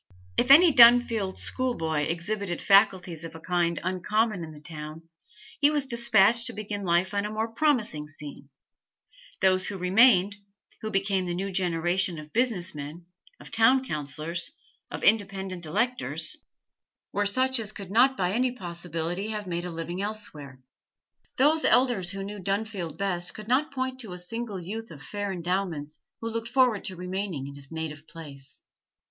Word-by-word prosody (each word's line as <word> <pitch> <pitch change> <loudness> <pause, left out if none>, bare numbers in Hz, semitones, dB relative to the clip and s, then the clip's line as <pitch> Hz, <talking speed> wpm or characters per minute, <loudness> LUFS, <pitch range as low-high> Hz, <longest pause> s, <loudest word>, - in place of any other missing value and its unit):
If 245 - +1
any 320 +3 +8
Dunfield 235 -5 +6
schoolboy 160 - -1
exhibited 175 +2 -3
faculties 190 -5 +3
of 165 0 -8
a - - -8
kind 170 0 0
uncommon 190 +2 0
in 160 - -8
the 150 - -11
town, 155 +1 -8 0.6
he 290 0 +5
was 295 -2 0
despatched 235 -2 +3
to - - -4
begin 205 -1 -5
life 180 +1 +1
on 200 0 0
a 210 - -3
more 220 +1 -2
promising 230 - 0
scene; 145 -2 -10 0.9
those 185 -1 +3
who 200 - -4
remained, 200 +1 +4 0.4
who 220 - -3
became 195 -2 0
the 175 - -2
new 195 +2 -3
generation 175 0 0
of 155 0 -10
business 220 -7 0
men, 150 +4 -8 0.3
of - - -12
town 255 +4 +4
councillors, 155 - -3 0.4
of - - -6
independent 190 -5 +2
electors, 250 +11 -1 0.8
were 205 0 +1
such 260 +4 +2
as 215 -2 -3
could 200 -3 -9
not 255 +5 +4
by 180 0 0
any 250 +3 +1
possibility 175 -2 -4
have 215 -1 -4
made 175 -1 -3
a 180 - -4
living 165 +3 -4
elsewhere. 160 -11 -6 0.8
Those 305 +4 +3
elders 245 -8 +3
who 195 +1 -4
knew 205 +1 -7
Dunfield 195 -4 -3
best 180 -2 -2
could 215 0 -8
not 265 +5 +2
point 260 -1 -3
to 220 -8 -5
a - - -7
single 210 +2 -4
youth 220 +6 -6
of 150 -2 -11
fair 205 -1 -4
endowments 175 -4 -2 0.2
who 230 - -3
looked 230 0 -4
forward 250 -5 +2
to 185 - -4
remaining 180 -4 -4
in 140 - -8
his 140 0 -13
native 160 -1 -5
place. 145 -3 -10
190 Hz, 165 wpm, -27 LUFS, 170-225 Hz, 0.9 s, any